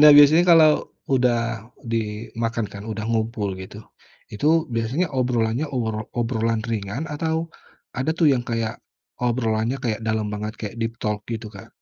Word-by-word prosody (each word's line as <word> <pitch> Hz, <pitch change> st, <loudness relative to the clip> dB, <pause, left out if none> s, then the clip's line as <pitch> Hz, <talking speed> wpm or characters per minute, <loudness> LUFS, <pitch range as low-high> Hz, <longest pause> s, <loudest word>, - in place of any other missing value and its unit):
nah 150 Hz, 0 st, +10 dB
biasanya 155 Hz, +4 st, +8 dB
kalau 165 Hz, -2 st, +8 dB, 0.5 s
udah 125 Hz, -2 st, +3 dB, 0.6 s
dimakan 115 Hz, +1 st, -2 dB
kan 100 Hz, 0 st, -8 dB
udah 110 Hz, 0 st, -3 dB
ngumpul 110 Hz, -2 st, 0 dB
gitu, 95 Hz, -, -10 dB, 0.6 s
itu 105 Hz, +8 st, -2 dB, 0.3 s
biasanya 120 Hz, +10 st, 0 dB
obrolannya 120 Hz, +1 st, +1 dB
obrol 110 Hz, -3 st, -1 dB
obrolan 115 Hz, -1 st, 0 dB
ringan 110 Hz, +4 st, -2 dB
atau 160 Hz, +2 st, -1 dB, 0.6 s
ada 130 Hz, +5 st, 0 dB
tuh 165 Hz, -, +5 dB
yang 120 Hz, -2 st, 0 dB
kayak, 115 Hz, -1 st, -1 dB, 0.5 s
obrolannya 115 Hz, 0 st, +1 dB
kayak 115 Hz, -2 st, -1 dB
dalam 110 Hz, -1 st, 0 dB
banget 105 Hz, +1 st, -3 dB
kayak 110 Hz, +1 st, -5 dB
deep 115 Hz, 0 st, -1 dB
talk 105 Hz, -1 st, 0 dB
gitu, 110 Hz, 0 st, -4 dB
Kak? 95 Hz, -, -11 dB
115 Hz, 145 wpm, -23 LUFS, 110-125 Hz, 0.6 s, nah